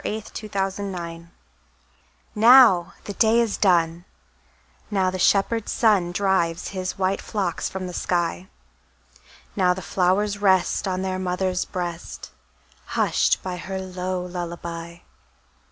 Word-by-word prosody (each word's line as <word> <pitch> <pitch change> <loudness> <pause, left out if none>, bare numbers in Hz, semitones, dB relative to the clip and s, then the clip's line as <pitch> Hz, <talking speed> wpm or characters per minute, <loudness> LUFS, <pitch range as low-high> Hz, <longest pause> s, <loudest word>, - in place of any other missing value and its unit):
Louisa 215 0 -3
May 215 - -6
Alcott 195 -1 -1
Lullaby 170 -4 -6 1.1
NOW 225 -5 +6
the 205 - -6
day 225 +2 +3
is 230 -3 +1
done, 170 -3 +2 0.9
Now 190 -3 +1
the 185 - -5
shepherd 205 +4 +2
sun 200 -7 +2
Drives 180 -3 0
his 185 -2 -4
white 190 +1 0
flocks 190 -6 -2
from 190 -1 -5
the 180 - -6
sky; 175 +1 -1 1.1
Now 180 -2 +2
the 190 - -7
flowers 200 +3 +1
rest 190 -1 +2
On 185 0 -2
their 185 -1 -2
mother's 185 0 -1
breast, 175 -2 -6 0.7
Hushed - - +2
by 185 -1 -4
her 190 +2 -5
low 185 -1 -4
lullaby. 170 -1 -6
185 Hz, 125 wpm, -23 LUFS, 175-200 Hz, 1.1 s, NOW